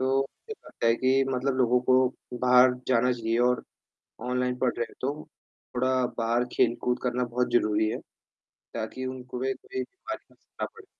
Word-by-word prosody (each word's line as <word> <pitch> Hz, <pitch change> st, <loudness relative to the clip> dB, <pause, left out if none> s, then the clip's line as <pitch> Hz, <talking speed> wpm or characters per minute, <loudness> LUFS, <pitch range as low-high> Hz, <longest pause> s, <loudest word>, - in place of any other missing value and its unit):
तो, 135 Hz, +1 st, +2 dB
मुझे 135 Hz, -, -6 dB
लगता -, -, -3 dB
है 115 Hz, -, +5 dB
कि 130 Hz, +2 st, +3 dB
मतलब 130 Hz, +1 st, 0 dB
लोगों 125 Hz, -1 st, +3 dB
को 130 Hz, -1 st, +2 dB
बाहर 125 Hz, 0 st, +7 dB, 0.2 s
जाना 125 Hz, 0 st, +3 dB
चाहिए 115 Hz, -1 st, -1 dB
और 125 Hz, -, 0 dB, 0.7 s
ऑनलाइन 125 Hz, 0 st, 0 dB
पढ़ 125 Hz, -2 st, +2 dB
रहे 120 Hz, -, 0 dB
हैं, -, -, -17 dB
तो 145 Hz, +4 st, -3 dB, 0.5 s
थोड़ा 130 Hz, 0 st, +2 dB
बाहर 115 Hz, +1 st, +2 dB
खेल-कूद 120 Hz, +1 st, +1 dB
करना 125 Hz, 0 st, 0 dB
बहुत 125 Hz, +1 st, -1 dB
ज़रूरी 110 Hz, -2 st, +3 dB
है। -, -, -3 dB, 0.8 s
ताकि 130 Hz, -, -4 dB
उनको 130 Hz, -1 st, -6 dB
भी 135 Hz, +1 st, 0 dB
कोई 395 Hz, -2 st, -5 dB
बीमारी 390 Hz, 0 st, -8 dB
बस -, -, -37 dB
ना -, -, +1 dB
पड़े। 450 Hz, -2 st, -15 dB
125 Hz, 175 wpm, -27 LUFS, 120-130 Hz, 0.8 s, बाहर